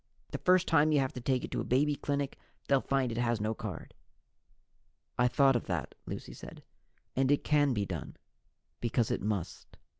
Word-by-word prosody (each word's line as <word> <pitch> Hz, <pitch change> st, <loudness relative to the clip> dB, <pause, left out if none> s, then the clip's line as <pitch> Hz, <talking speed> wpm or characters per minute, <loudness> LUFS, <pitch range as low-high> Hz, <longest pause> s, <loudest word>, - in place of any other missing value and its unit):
The -, -, -3 dB
first 185 Hz, 0 st, +4 dB
time 155 Hz, -1 st, +4 dB
you 150 Hz, -, +4 dB
have 135 Hz, -1 st, 0 dB
to 125 Hz, -, -6 dB
take 130 Hz, 0 st, 0 dB
it -, -, -6 dB
to -, -, -1 dB
a -, -, -2 dB
baby 145 Hz, +4 st, +2 dB
clinic, 140 Hz, -1 st, -2 dB, 0.3 s
they'll 135 Hz, -1 st, +4 dB
find 135 Hz, -3 st, 0 dB
it 115 Hz, -, -3 dB
has 120 Hz, -2 st, +1 dB
no 110 Hz, +1 st, 0 dB
card." 105 Hz, -6 st, -7 dB, 1.2 s
"I 125 Hz, -, +3 dB
thought 135 Hz, +1 st, +4 dB
of 120 Hz, -, -1 dB
that," 90 Hz, -5 st, -2 dB
Lucy -, -, -6 dB
said, -, -, -11 dB, 0.5 s
"and 130 Hz, 0 st, +2 dB
it 145 Hz, -, +2 dB
can 145 Hz, -2 st, +3 dB
be 100 Hz, -1 st, 0 dB
done, -, -, -6 dB, 0.6 s
because 120 Hz, -1 st, 0 dB
it -, -, -1 dB
must. 100 Hz, -4 st, -4 dB
130 Hz, 190 wpm, -31 LUFS, 115-145 Hz, 1.2 s, first